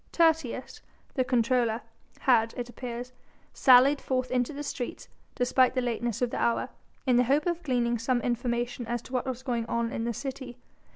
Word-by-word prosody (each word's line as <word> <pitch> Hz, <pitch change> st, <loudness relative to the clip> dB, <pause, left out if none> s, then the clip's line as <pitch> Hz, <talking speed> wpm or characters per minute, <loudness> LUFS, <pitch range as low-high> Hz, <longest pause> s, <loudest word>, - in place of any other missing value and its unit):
Tertius 320 Hz, -7 st, +1 dB, 0.3 s
the 260 Hz, -, +1 dB
comptroller 240 Hz, -2 st, +1 dB, 0.4 s
had, 230 Hz, -3 st, +3 dB
it 245 Hz, -1 st, -4 dB
appears, 245 Hz, +1 st, -6 dB, 0.4 s
sallied 265 Hz, +2 st, +6 dB
forth 255 Hz, -1 st, -1 dB
into 250 Hz, +2 st, +1 dB
the 290 Hz, 0 st, -6 dB
streets, 255 Hz, -4 st, -5 dB, 0.3 s
despite 255 Hz, +1 st, +3 dB
the -, -, +2 dB
lateness 240 Hz, -1 st, -2 dB
of 240 Hz, -, 0 dB
the -, -, -2 dB
hour, 235 Hz, -, +1 dB, 0.4 s
in 250 Hz, -2 st, +4 dB
the 250 Hz, -, +4 dB
hope 280 Hz, +4 st, +2 dB
of 345 Hz, -1 st, -1 dB
gleaning 240 Hz, -5 st, 0 dB
some 240 Hz, +2 st, +1 dB
information 240 Hz, 0 st, -2 dB
as 240 Hz, 0 st, -2 dB
to 260 Hz, -, -13 dB
what 255 Hz, +1 st, -1 dB
was 260 Hz, 0 st, -4 dB
going 235 Hz, -3 st, -2 dB
on 235 Hz, 0 st, -1 dB
in 225 Hz, -, -3 dB
the 235 Hz, -, -1 dB
city. 265 Hz, -2 st, -6 dB
245 Hz, 180 wpm, -28 LUFS, 235-260 Hz, 0.4 s, sallied